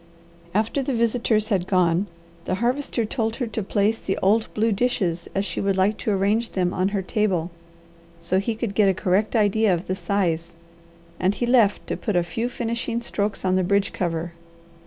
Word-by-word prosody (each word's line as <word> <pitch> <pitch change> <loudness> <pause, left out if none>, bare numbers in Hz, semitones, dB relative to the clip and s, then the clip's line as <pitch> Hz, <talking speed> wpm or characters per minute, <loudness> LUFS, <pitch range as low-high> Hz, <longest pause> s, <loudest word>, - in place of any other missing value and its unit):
After 220 +6 +1
the 270 -1 -1
visitors 230 -2 +1
had 190 -4 0
gone, 180 0 +2 0.4
the 185 - 0
Harvester 240 +2 0
told 225 0 -2
her 245 - -2
to 220 -1 -3
place 210 +3 +1
the 195 - -2
old 215 +4 +2
blue 220 +1 +2
dishes 195 -6 0
as 195 +1 0
she 175 - -3
would 195 -1 0
like 195 +3 +3
to - - -2
arrange 210 +3 +1
them 180 -1 0
on 185 +1 +1
her 200 -1 -1
table, 185 -4 0 0.7
so 175 +3 0
he 220 +3 -2
could 220 -2 -3
get 200 -1 +4
a 190 - +1
correct 200 +4 +1
idea 215 -1 +3
of 175 0 -1
the 185 - -2
size, 170 -3 -1 0.6
and 190 +3 +1
he 240 - -1
left 235 -5 +3
to - - -3
put 210 -5 -3
a 175 - +3
few 230 +7 -3
finishing 235 -1 -2
strokes 210 -4 -2
on 185 0 +2
the 185 - +2
bridge 200 +2 +1
cover. 170 -1 -2
200 Hz, 195 wpm, -23 LUFS, 185-225 Hz, 0.7 s, get